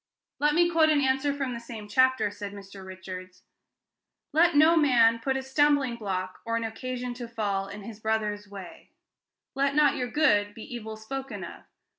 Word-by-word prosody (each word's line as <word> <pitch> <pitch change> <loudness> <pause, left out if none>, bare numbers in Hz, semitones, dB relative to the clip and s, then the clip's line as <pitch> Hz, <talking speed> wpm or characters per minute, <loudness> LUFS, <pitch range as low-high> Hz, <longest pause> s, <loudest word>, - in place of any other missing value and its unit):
"Let 295 +1 +2
me 345 +1 +5
quote 325 -2 +3
an 305 -2 +4
answer 270 +1 +1
from 275 -3 -3
the 235 - -5
same 230 -3 -9
chapter," 255 -1 +3
said 205 0 -7
Mr. 195 -1 -11
Richards. 185 -1 -9 0.9
"'Let 335 +1 +4
no 315 +3 +6
man 235 -7 +4
put 265 +3 -1
a 265 - -4
stumbling 275 -2 +2
block, 185 -4 -4
or 230 0 -1
an 230 - -2
occasion 250 +2 -4
to 240 -1 -7
fall, 205 -4 -2
in 200 +1 -9
his 215 0 -9
brother's 215 -2 -2
way: 195 -3 -11 0.6
let 275 +1 0
not 295 -2 +4
your 250 -1 -2
good 210 -9 +2
be 225 - -9
evil 220 -3 -7
spoken 220 -2 -6
of. - - -10
235 Hz, 180 wpm, -27 LUFS, 205-270 Hz, 0.9 s, no